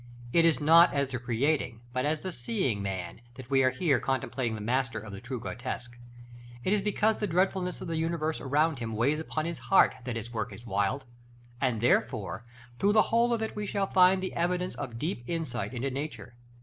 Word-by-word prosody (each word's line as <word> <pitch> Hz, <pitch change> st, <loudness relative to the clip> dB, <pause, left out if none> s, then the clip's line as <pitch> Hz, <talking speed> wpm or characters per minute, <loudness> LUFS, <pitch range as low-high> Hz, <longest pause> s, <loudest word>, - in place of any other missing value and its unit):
It 170 Hz, -1 st, +5 dB
is 165 Hz, -2 st, +3 dB
not 165 Hz, +3 st, +7 dB
as 140 Hz, -1 st, +1 dB
the 125 Hz, -2 st, -3 dB
creating 120 Hz, 0 st, 0 dB
but 130 Hz, +2 st, 0 dB
as 155 Hz, 0 st, 0 dB
the 185 Hz, -, -4 dB
seeing 125 Hz, -, -1 dB
man, 95 Hz, 0 st, -4 dB
that 130 Hz, 0 st, -11 dB
we 135 Hz, -1 st, +5 dB
are 130 Hz, -, +5 dB
here 130 Hz, 0 st, +1 dB
contemplating 130 Hz, -3 st, -1 dB
the -, -, -6 dB
master 120 Hz, +1 st, 0 dB
of 110 Hz, -1 st, -7 dB
the 100 Hz, -, -8 dB
true 125 Hz, +1 st, -5 dB
grotesque. 120 Hz, +1 st, -5 dB, 0.7 s
It 190 Hz, -, +2 dB
is 210 Hz, -, +2 dB
because 210 Hz, +2 st, +1 dB
the 210 Hz, -, -1 dB
dreadfulness 180 Hz, 0 st, 0 dB
of 185 Hz, -, -5 dB
the 165 Hz, -1 st, -2 dB
universe 160 Hz, -1 st, -1 dB
around 145 Hz, +1 st, +1 dB
him 115 Hz, -2 st, -4 dB
weighs 140 Hz, +8 st, +2 dB
upon 155 Hz, 0 st, -3 dB
his 170 Hz, 0 st, -4 dB
heart, 195 Hz, -, +4 dB
that 120 Hz, -2 st, -3 dB
his 115 Hz, +1 st, -6 dB
work 110 Hz, -, -3 dB
is 120 Hz, -, -11 dB
wild; 100 Hz, +6 st, -1 dB, 0.6 s
and 125 Hz, -5 st, +1 dB
therefore 110 Hz, -3 st, +1 dB, 0.4 s
through 205 Hz, +1 st, +3 dB
the 215 Hz, -, +7 dB
whole 235 Hz, +1 st, +4 dB
of 230 Hz, -2 st, +1 dB
it 220 Hz, -, -4 dB
we 210 Hz, -1 st, -3 dB
shall 195 Hz, 0 st, 0 dB
find 185 Hz, 0 st, +5 dB
the 185 Hz, -, -3 dB
evidence 180 Hz, +1 st, 0 dB
of 120 Hz, -5 st, -6 dB
deep 150 Hz, -2 st, -3 dB
insight 160 Hz, -10 st, -3 dB
into 130 Hz, +2 st, -2 dB
nature. 130 Hz, -5 st, -5 dB
135 Hz, 210 wpm, -29 LUFS, 120-170 Hz, 0.7 s, not